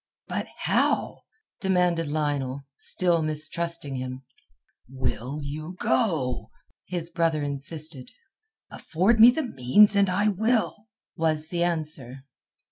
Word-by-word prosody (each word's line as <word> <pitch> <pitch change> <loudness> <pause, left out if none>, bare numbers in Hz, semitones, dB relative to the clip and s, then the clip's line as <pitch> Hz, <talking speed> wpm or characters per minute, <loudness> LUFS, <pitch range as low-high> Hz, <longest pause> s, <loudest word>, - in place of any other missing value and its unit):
"But - - -3
how?" - - 0 0.3
demanded 180 -4 +1
Lionel, 145 -3 -2
still 175 +1 +1
mistrusting 155 -1 -2
him. 130 +1 -6 0.7
"Will 130 +1 -3
you 155 +5 -6
go?" 155 - 0 0.4
his 175 -2 -3
brother 165 -3 0
insisted. 145 0 +1 0.6
"Afford 195 +8 0
me 230 +2 +10
the 310 +6 0
means 205 - +4
and 200 -1 +3
I 200 +4 +1
will," 215 +1 0 0.3
was 160 -2 0
the 175 -1 -1
answer. 150 -6 -3
160 Hz, 110 wpm, -25 LUFS, 140-180 Hz, 0.7 s, me